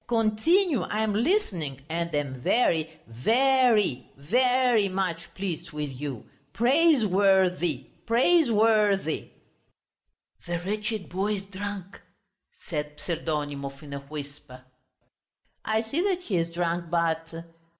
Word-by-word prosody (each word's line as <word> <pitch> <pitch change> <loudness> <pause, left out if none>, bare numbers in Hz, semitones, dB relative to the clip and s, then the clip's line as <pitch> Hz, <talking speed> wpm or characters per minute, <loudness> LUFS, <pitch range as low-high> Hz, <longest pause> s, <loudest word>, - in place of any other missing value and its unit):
"Continue, 240 - +2
I 215 +4 -2
am 220 -1 0
listening, 200 - 0
and 170 0 -2
am 135 -3 -3
very, 160 - +2 0.2
ve 115 - -2 0.4
ry, 210 - +2
ve 155 - 0
ry 250 -4 +3
much 185 -3 -3
pleased 185 -5 -4
with 150 -2 -4
you! 135 -2 -6 0.3
Praisewor 215 - +4
thy, 165 -7 -3 0.2
praisewor 230 - +4
thy!" 160 -5 -4 1.2
"The 175 0 -3
wretched 210 0 -3
boy 195 +4 -1
is 195 -1 -7
drunk," 200 -1 -7 0.7
said 150 -3 -4
Pseldonimov 145 -4 -4
in 145 -1 -9
a 140 - -4
whisper. 140 -2 -10 1.0
"I 220 0 +1
see 280 +9 -2
that 370 -2 0
he 210 - -2
is 165 0 0
drunk, 170 0 -2
but...." 165 -1 0
185 Hz, 120 wpm, -26 LUFS, 155-220 Hz, 1.2 s, Praisewor